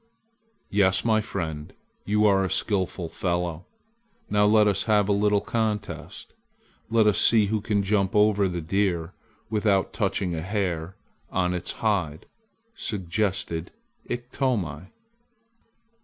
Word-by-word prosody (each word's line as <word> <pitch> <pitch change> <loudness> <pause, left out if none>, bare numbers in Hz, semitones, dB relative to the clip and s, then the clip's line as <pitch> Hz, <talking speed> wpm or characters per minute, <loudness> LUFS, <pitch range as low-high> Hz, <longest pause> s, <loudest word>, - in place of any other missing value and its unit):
"Yes, 95 -1 +2
my 110 -1 +3
friend, 80 -7 -5 0.3
you 105 +1 +2
are 100 -2 +4
a 95 - -1
skillful 95 -2 -1
fellow. 85 -1 -3 0.6
Now 105 0 +4
let 105 0 +5
us 100 -2 +1
have 105 -3 +3
a - - +1
little 105 0 +2
contest. 105 -2 -3 0.6
Let 110 -1 +3
us 105 - +3
see 110 -3 +5
who 105 +1 -1
can 105 -2 0
jump 100 -1 +1
over 105 -1 +4
the 90 -2 -3
deer 85 -1 -1 0.4
without 105 -3 +1
touching 90 -2 -1
a 80 - -3
hair 95 -2 -2 0.3
on 90 -1 0
his 90 -1 -3
hide," 90 -9 -1 0.5
suggested 95 - -2 0.4
Iktomi. 120 - -2
100 Hz, 125 wpm, -25 LUFS, 90-105 Hz, 0.6 s, let